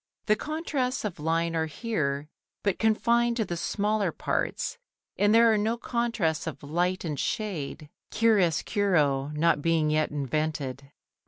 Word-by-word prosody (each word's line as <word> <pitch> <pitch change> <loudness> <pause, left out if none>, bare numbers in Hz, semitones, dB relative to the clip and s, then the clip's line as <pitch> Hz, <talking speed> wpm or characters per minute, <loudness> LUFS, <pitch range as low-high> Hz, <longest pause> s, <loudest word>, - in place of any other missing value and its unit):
The 215 - +4
contrasts 285 -3 -2
of 195 -7 -4
line 165 +2 0
are 160 0 0
here 150 -6 -2 0.4
but 200 -3 0
confined 235 +2 +2
to 220 - +1
the 175 - -3
smaller 205 +1 0
parts, 480 - -2 0.4
and 205 +1 +3
there 230 0 +6
are 215 - +2
no 220 +3 0
contrasts 230 -11 -1
of 160 - -6
light 175 +5 -1
and 150 -4 -3
shade, 175 -9 -3 0.2
chiaroscuro 180 -8 +2
not 160 -1 +2
being 160 -1 +2
yet 155 0 +2
invented. 140 -1 -3
175 Hz, 140 wpm, -27 LUFS, 155-220 Hz, 0.4 s, there